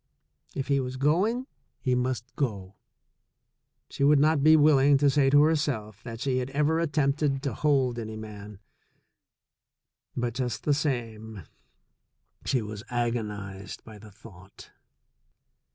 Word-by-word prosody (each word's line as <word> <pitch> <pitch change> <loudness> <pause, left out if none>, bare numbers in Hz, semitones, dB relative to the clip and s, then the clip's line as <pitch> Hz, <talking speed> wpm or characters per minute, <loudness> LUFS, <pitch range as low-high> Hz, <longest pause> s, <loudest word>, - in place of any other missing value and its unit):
If 135 - -3
he 140 -1 +2
was 130 0 -4
going, 190 - +1 0.3
he 130 - 0
must 125 0 -2
go. 100 -8 -3 1.2
She - - -2
would 145 +1 +5
not 150 +1 +3
be 155 +2 +6
willing 145 -2 +5
to 140 0 +3
say 135 -1 +3
to 145 +1 +6
herself 135 -10 -1
that 115 -2 -8
she 130 0 0
had 125 +1 -3
ever 150 +4 +1
attempted 145 -3 0
to 140 - -2
hold 135 -5 +1
any 110 -1 -6
man. 105 -1 -9 1.6
But, 120 -1 -1
just 125 -1 -3
the 145 - +2
same, 115 - -3 1.0
she 125 -4 0
was 105 -1 -7
agon 120 -2 -1
ized 100 -1 -8
by 110 -2 -12
the 110 - -13
thought. 95 -2 -15
130 Hz, 135 wpm, -27 LUFS, 110-145 Hz, 1.6 s, be